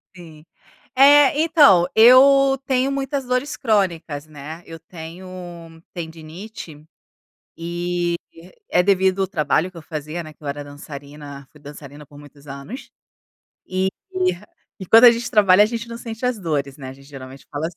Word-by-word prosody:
Sim. 160 -3 -14 0.5
É, 285 +1 +6
então, 295 - +5
eu 270 +4 +6
tenho 260 0 0
muitas 275 0 -3
dores 255 +4 -2
crônicas, 175 - -1
né, 155 +2 -10
eu 165 0 -11
tenho 165 +2 -11 0.7
tendinite, 160 0 -10 0.7
e 175 +1 -3 0.5
é 180 - +2
devido 190 0 +1
o 190 - 0
trabalho 160 +1 0
que 180 - -19
eu 165 - -10
fazia, 155 +2 -6
né, 155 - -11
que 150 - -30
eu 145 - -6
era 145 +1 -5
dançarina, 145 -1 -11
fui 150 - -19
dançarina 145 0 -12
por 145 - -16
muitos 145 0 -17
anos. 140 - -9 0.8
E 185 +1 -1 0.2
e 185 0 0 0.5
e 190 - -7
quando 225 +6 +6
a 240 - +11
gente 235 +1 -3
trabalha, 200 -2 +5
a - - +4
gente 230 +1 -6
não 230 - -7
sente 230 0 -8
as 250 -3 -1
dores, 145 -6 -3
né, 130 -3 -9
a - - -9
gente 135 +1 -18
geralmente 135 -1 -12
fala 145 +2 -3
assi 170 - -9
175 Hz, 165 wpm, -20 LUFS, 150-225 Hz, 0.8 s, a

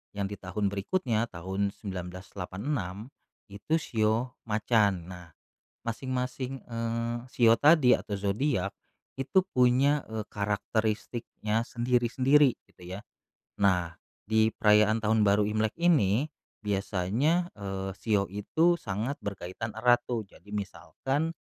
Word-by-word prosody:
yang 100 -1 -1
di 105 - -5
tahun 100 +2 -2
berikutnya 115 - 0
tahun 95 +3 -2
1986, 95 +3 -5 0.6
itu 105 +11 -1
shio 115 0 0
macan. 105 -5 +2
Nah, 90 -2 -10 0.6
masing-masing, 130 +2 -3
eee, 115 0 -2 0.2
shio 115 -2 +6
tadi 150 -4 +6
atau 105 - -9
zodiak, 100 0 0 0.5
itu 160 +8 +2
punya, 130 +4 +4
eee, 110 -1 -4
karakteristiknya 110 +2 -1
sendiri-sendiri 125 +3 +3
gitu - - -20
ya. - - -8 0.6
Nah, 90 -4 +2 0.3
di 110 +1 +3
perayaan 105 +1 +4
Tahun 110 +1 +3
Baru 100 0 +4
Imlek 110 +1 0
ini, 145 - +3 0.4
biasanya, 105 - 0
eee, 95 -1 -4
shio 105 -3 +1
itu 160 - +2
sangat 110 +7 -3
berkaitan 100 +3 -5
erat 120 +1 +4
tuh, 115 -4 -1
jadi 100 - -19
misalkan 135 +9 -2
110 Hz, 110 wpm, -29 LUFS, 100-125 Hz, 0.6 s, shio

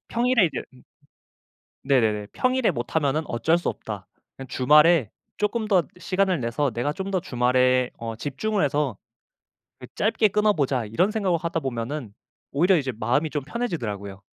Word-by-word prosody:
평일에 240 -4 +3
이제 155 - -4
음 125 - -19 1.0
네네네. 110 -7 +2
'평일에 255 -1 +1
못하면은 145 +4 -1
어쩔 160 +8 +1
수 175 - -3
없다. 100 -4 -6 0.3
그냥 135 -2 -9
주말에 150 - +4 0.3
쪼끔 215 +1 -1
더 190 -4 +4 0.2
시간을 185 -3 0
내서 125 +4 0
내가 120 +6 -2
좀 190 +4 -5
더 185 - 0
주말에 125 -3 +2
어 115 -1 -5
집중을 175 - -1
해서 145 -5 0 0.8
그 - - -10
짧게 215 +1 +2
끊어보자.' 155 - +1
이런 180 - +1
생각을 195 -6 +1
하다 170 -1 -1
보면은 120 -1 -4 0.4
오히려 175 +6 +3
이제 135 -4 -1
마음이 130 +8 +1
좀 145 -3 -3
편해지더라고요. 115 - -4
145 Hz, 335 characters per minute, -24 LUFS, 125-185 Hz, 1.0 s, 주말에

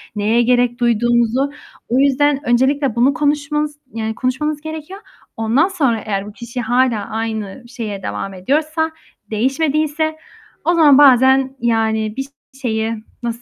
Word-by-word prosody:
neye 215 +3 +2
gerek 245 0 +2
duyduğumuzu. 240 +3 +2 0.4
O 250 - +2
yüzden 280 +1 +3
öncelikle 265 +1 +2
bunu 250 +4 +3
konuşmanız, 300 0 -1
yani, 220 0 -3
konuşmanız 290 +4 -2
gerekiyor. 315 +4 -7 0.4
Ondan 230 +9 +2
sonra 280 - 0
eğer 200 -1 -2
bu - - -8
kişi 235 +2 -6
hâlâ 240 -2 +1
aynı 220 +1 -4
şeye 220 -6 -6
devam 105 - -4
ediyorsa, 310 - -1 0.4
değişmediyse 305 +6 0 0.5
o 345 - +3
zaman 300 -5 +6
bazen 265 -1 +5
yani 220 -2 0
bir 270 0 -3 0.3
şeyi, 220 -2 -1 0.3
nasıl 235 0 -3
255 Hz, 130 wpm, -18 LUFS, 225-290 Hz, 0.5 s, zaman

